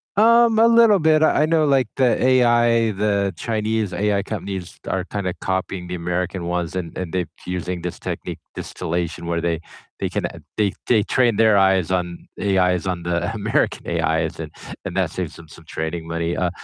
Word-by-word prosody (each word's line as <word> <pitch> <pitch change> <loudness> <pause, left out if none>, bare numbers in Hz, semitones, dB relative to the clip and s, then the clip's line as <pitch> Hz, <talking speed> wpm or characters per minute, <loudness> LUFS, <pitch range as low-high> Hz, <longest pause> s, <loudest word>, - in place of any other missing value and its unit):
Um, 230 +1 +5
a 230 +1 +6
little 230 -3 +6
bit. 155 0 +4
I 155 - +4
I - - +4
know 160 -1 +2
like 135 -5 +3
the 130 -3 +2
AI 120 -3 +4
the 100 -1 0
Chinese 110 -2 -1
AI 100 -1 +1
companies 95 -4 -6
are 95 -1 -1
kinda 95 -2 -3
copying 95 -1 -2
the 90 - -5
American 90 +1 -2
ones 85 0 -2
and 85 -3 -4
and 90 -2 -5
they're 90 -2 -1 0.2
using 90 -1 -4
this 90 - -5
technique - - -5 0.2
distillation 85 -1 -4
where 85 -1 -1
they 85 -1 0 0.4
they - - -1
can - - -2 0.3
they 105 -3 +2
they 110 -4 +4
train 120 -2 +2
their 110 -1 +5
eyes 95 -2 +3
on 90 -1 -2
AIs 90 -2 +2
on 90 -2 -2
the 85 +4 -1
American 105 0 0 0.2
AIs - - 0
and - - -6 0.3
and - - -4
that - - +1
saves - - -4
them 85 - -13
some 80 +1 -15
training 80 +1 -4
money. 85 +1 -2
Uh, 90 -1 0
95 Hz, 185 wpm, -21 LUFS, 90-115 Hz, 0.4 s, a